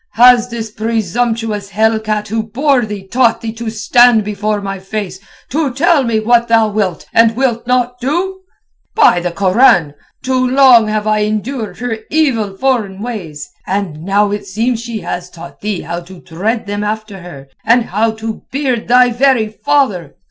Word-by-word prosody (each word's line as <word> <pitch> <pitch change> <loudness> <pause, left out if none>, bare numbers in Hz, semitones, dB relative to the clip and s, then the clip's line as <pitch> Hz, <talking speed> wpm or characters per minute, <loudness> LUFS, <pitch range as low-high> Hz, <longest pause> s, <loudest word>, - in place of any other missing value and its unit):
"Has 245 0 +5
this 225 -2 -6
presumptuous 225 -1 -2
hellcat 215 0 0
who 225 +1 -1
bore 245 +2 0
thee 200 -2 -7
taught 235 +1 +2
thee 225 -1 -5
to 230 0 -5
stand 225 +1 +4
before 210 0 -2
my 195 -1 -5
face, 190 -1 -5 0.3
to 290 0 -1
tell 300 +3 +2
me 225 -2 +1
what 235 +2 +2
thou 225 -1 +3
wilt 200 -6 -2
and 230 0 +4
wilt 240 -2 -1
not 250 0 0
do? 350 +9 -2 0.6
By 180 - +5
the 175 0 -2
Koran! 185 - +3 0.3
too 255 0 +1
long 255 -4 +6
have 215 0 -2
I 215 0 +1
endured 215 +2 -3
her 235 -2 -4
evil 230 -11 0
foreign 220 -7 -1
ways, 185 -11 -6 0.2
and 190 -6 -3
now 200 +3 +1
it 205 -1 -4
seems 225 +4 -1
she 235 -3 -6
has 175 0 -5
taught 170 0 -12
thee 205 -3 -3
how 170 +1 -5
to 175 +1 -13
tread 215 +10 -3
them 205 0 -3
after 215 -1 -4
her 145 -7 -11 0.2
and 235 +2 +3
how 215 +5 0
to 220 0 -6
beard 260 -4 -2
thy 250 +1 +5
very 240 -3 +2
father! 215 - -1
220 Hz, 170 wpm, -15 LUFS, 200-245 Hz, 0.6 s, long